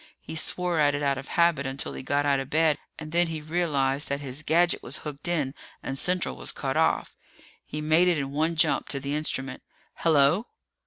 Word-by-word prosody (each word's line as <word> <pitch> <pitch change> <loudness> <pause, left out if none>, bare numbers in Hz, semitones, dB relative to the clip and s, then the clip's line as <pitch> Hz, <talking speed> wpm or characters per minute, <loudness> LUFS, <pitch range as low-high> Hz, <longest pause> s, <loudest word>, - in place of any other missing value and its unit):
He 160 - -8
swore 175 +1 0
at 145 -1 +4
it 145 - -2
out 140 -2 +1
of 135 - -9
habit 170 -5 +2
until 135 +1 -3
he - - -6
got 145 +2 0
out 140 -1 +3
of 135 0 -5
bed, 155 -1 +3 0.2
and 155 0 -8
then 175 +1 +3
he 160 -1 -4
realized 150 -4 0
that 140 0 -1
his 140 0 -4
gadget 170 +3 +2
was - - -2
hooked 150 +1 -6
in 150 -6 0 0.3
and 135 - -3
Central 180 +5 0
was - - -3
cut - - -3
off. - - +1 0.5
He 150 - -5
made 160 +4 +4
it 175 -2 +3
in 135 -1 -3
one 160 +4 0
jump 155 -4 +2
to 140 +1 -2
the 140 +1 -4
instrument. 135 -3 -3 0.4
"Hello!" 160 - +3
150 Hz, 210 wpm, -27 LUFS, 140-165 Hz, 0.5 s, at